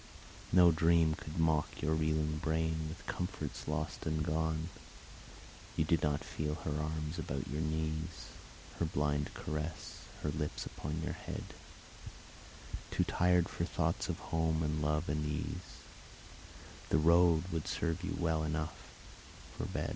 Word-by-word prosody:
No 90 -1 +8
dream 80 0 +4
could 75 +1 -7
mock 80 -2 +2
Your 80 +1 +1
reeling 75 -1 +1
brain 80 0 0
with 80 - -8
comforts 90 -5 -3
lost 75 -1 -2
and 80 0 +1
gone. 80 0 0 1.1
You 80 - +2
did 80 0 +3
not 75 -1 +1
feel 75 0 -2
her 75 -1 -2
arms 80 +1 -2
about 70 -4 -3
your 75 +3 -2
knees, 80 +1 -2 0.5
Her 85 - +3
blind 75 -2 0
caress, 75 +1 -4 0.2
her 75 - +1
lips 75 0 -2
upon 75 +3 -4
your - - -1
head: - - -5 1.5
Too - - +2
tired 90 -1 +3
for - - -3
thoughts - - 0
of - - -1 0.2
home 80 0 +2
and 75 0 0
love 75 +2 +1
and 75 +1 0
ease, 75 0 -4 1.1
The - - +4
road 85 +1 +6
would 80 -2 -2
serve 85 +1 -1
you 95 - -1
well 80 -2 +2
enough 75 0 -2 0.7
fo - - -3
80 Hz, 140 wpm, -35 LUFS, 75-80 Hz, 1.5 s, No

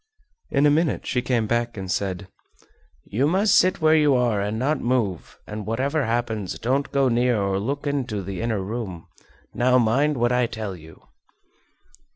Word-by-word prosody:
In 140 +1 +2
a 145 - +5
minute 155 0 +1
she 125 - 0
came 120 -3 0
back 120 +1 -1
and 95 -2 -4
said: 95 +1 -2 0.8
"You 125 +8 0
must 190 +5 +2
sit 185 -1 +3
where 155 0 +5
you 150 -3 +4
are 120 -5 +1
and 105 +2 -2
not 140 +5 0
move, 115 -8 -1
and 105 -1 -7
whatever 135 +6 0
happens 115 -4 -2
don't 135 +4 -1
go 140 -1 +2
near 120 -1 +2
or 100 -1 0
look 140 +8 -3
into 125 -8 -2
the 95 +2 -5
inner 110 -4 -1
room. 95 -5 -5 0.5
Now 125 +1 +3
mind 130 +5 +2
what 120 +1 +1
I 125 -1 +2
tell 110 -4 -5
you!" 80 -2 -15
120 Hz, 175 wpm, -23 LUFS, 105-140 Hz, 0.8 s, a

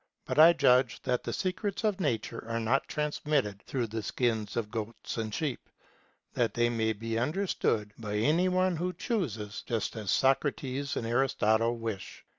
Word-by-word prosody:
But - - -1
I 165 +2 +9
judge 125 -5 +3
that 125 -1 0
the - - -3
secrets 195 +3 -2
of 210 -3 +1
nature 120 - -2
are 115 0 -1
not 120 +5 +1
transmitted 145 -8 -1
through 125 -3 -2
the 110 0 -4
skins 110 -2 -1
of 110 -2 -2
goats 115 0 -5
and 110 -1 -2
sheep, 145 +3 -3 0.6
that 115 -4 0
they 120 0 +3
may 110 -1 +1
be 115 +1 -2
understood 120 - 0
by 105 -2 -4
any 155 +12 +3
one 185 0 +2
who 180 +2 -2
chooses, 120 - -3
just 115 -4 -2
as 105 -4 -5
Socrates 135 +1 +1
and - - -2
Aristotle 115 -2 +2
wish. 115 -4 -6
120 Hz, 165 wpm, -30 LUFS, 110-150 Hz, 0.6 s, I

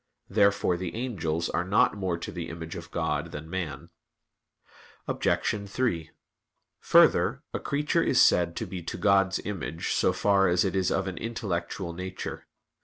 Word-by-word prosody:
Therefore 100 -3 +3
the 90 0 -5
angels 85 -10 -2
are 85 - 0
not 105 +7 +3
more 95 -4 -2
to 85 - -6
the 85 -1 -5
image 80 0 -7
of - - -8
God - - -2
than 75 +1 -7
man. 85 -3 -5 1.2
Obj. 100 -1 0
3: 90 -9 -1 0.7
Further, - - +4
a - - -1
creature 150 +4 0
is 125 - +2
said 85 -1 +4
to - - -3
be 90 -2 -6
to 85 - -5
God's 95 0 +3
image 85 -5 -4
so - - +3
far 100 -1 +3
as 90 +1 +3
it 95 - -1
is 95 -2 +2
of - - 0
an - - -5
intellectual 95 -5 -3
nature. 95 +2 -6
95 Hz, 160 wpm, -27 LUFS, 85-100 Hz, 1.2 s, Further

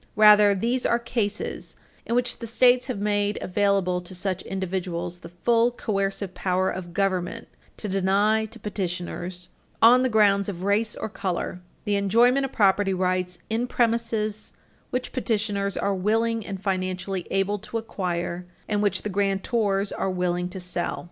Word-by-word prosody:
Rather, 210 -1 +7
these 240 +6 0
are 235 - +3
cases 230 -3 -3 0.3
in 235 - 0
which 245 0 0
the 230 - -5
States 250 +2 +4
have 255 - -3
made 205 0 0
available 190 -2 +1
to 180 +1 -9
such 185 0 -1
individuals 180 -2 -4
the 170 - -11
full 230 +7 +2
coercive 195 -4 -2
power 185 0 0
of 175 -1 -6
government 195 +3 -1 0.3
to 210 - -4
deny 200 +3 +2
to 225 +2 -11
petitioners, 180 -3 -4 0.3
on 245 +3 +7
the 255 - +2
grounds 205 -3 +3
of 180 -2 -6
race 210 +2 +1
or - - -4
color, 180 -3 -3 0.2
the 205 - 0
enjoyment 235 +7 +4
of 270 - -3
property 195 -1 +3
rights 180 -1 -1
in 230 +3 -1
premises 230 -3 0 0.4
which 250 0 -3
petitioners 210 -5 -1
are 200 - 0
willing 225 +4 0
and 195 -1 -7
financially 185 -1 -2
able 195 +2 0
to 215 +3 -5
acquire 180 -5 -3 0.2
and 205 -1 0
which 205 -1 0
the - - -2
grantors 200 +1 0
are - - -1
willing 180 -1 -1
to 190 +1 -7
sell. 180 -1 -2
200 Hz, 155 wpm, -25 LUFS, 185-220 Hz, 0.4 s, Rather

